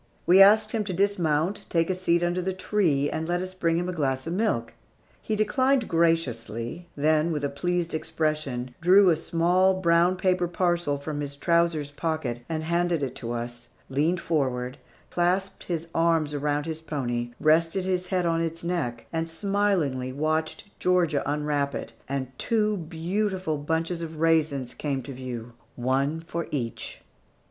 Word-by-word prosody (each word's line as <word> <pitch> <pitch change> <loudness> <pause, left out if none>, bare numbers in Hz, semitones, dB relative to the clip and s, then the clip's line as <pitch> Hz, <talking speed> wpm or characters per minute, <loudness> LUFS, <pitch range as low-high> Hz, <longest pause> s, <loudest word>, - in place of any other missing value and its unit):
We 185 +3 +7
asked 215 +2 +7
him 220 -2 0
to 190 - -3
dismount, 185 0 0
take 165 -1 +2
a 185 - +1
seat 175 -2 +1
under 175 +1 0
the 190 +1 -1
tree, 175 -8 +1
and 160 +2 -3
let 175 +1 0
us 185 +1 -5
bring 165 -3 +1
him 175 +1 -1
a 180 - -2
glass 135 -5 -1
of 165 - -3
milk. 180 - 0 0.5
He 215 - -1
declined 255 +3 +2
graciously, 165 - 0
then 155 +2 +2
with 150 -2 -2
a 140 - +1
pleased 175 +3 -1
expression, 155 -6 -2
drew 185 +2 +6
a - - +3
small 175 +4 +2
brown 170 0 +4
paper 185 -1 +1
parcel 175 -4 0
from 145 +1 -5
his 140 -1 -5
trousers 170 -2 +1
pocket 145 -6 -2
and 160 -1 -2
handed 170 -1 +1
it 130 -2 -2
to 120 -2 -5
us, 120 0 -5 0.2
leaned 155 +6 +1
forward, 130 -5 -1 0.3
clasped 185 +3 0
his 170 -2 -3
arms 165 -2 +2
about 145 0 -1
his 160 -1 -4
pony, 120 -6 -2
rested 165 +4 +3
his 185 -1 -1
head 180 -1 0
on 165 0 +1
its 165 0 -3
neck, 150 -10 -2
and 165 0 -1
smilingly 165 -8 0
watched 155 +3 -1 0.2
Georgia 175 -5 +2
unwrap 145 -1 -1
it, - - -6 0.2
and 135 -2 -2
two 215 -2 +1
beautiful 180 0 -2
bunches 165 +3 -1
of 160 -1 -6
raisins 155 -6 +2
come 140 -3 -3
to 135 - -7
view, 125 -2 -6 0.2
one 135 +5 0
for 165 0 -5
each. 120 -6 -4
165 Hz, 165 wpm, -26 LUFS, 145-180 Hz, 0.5 s, We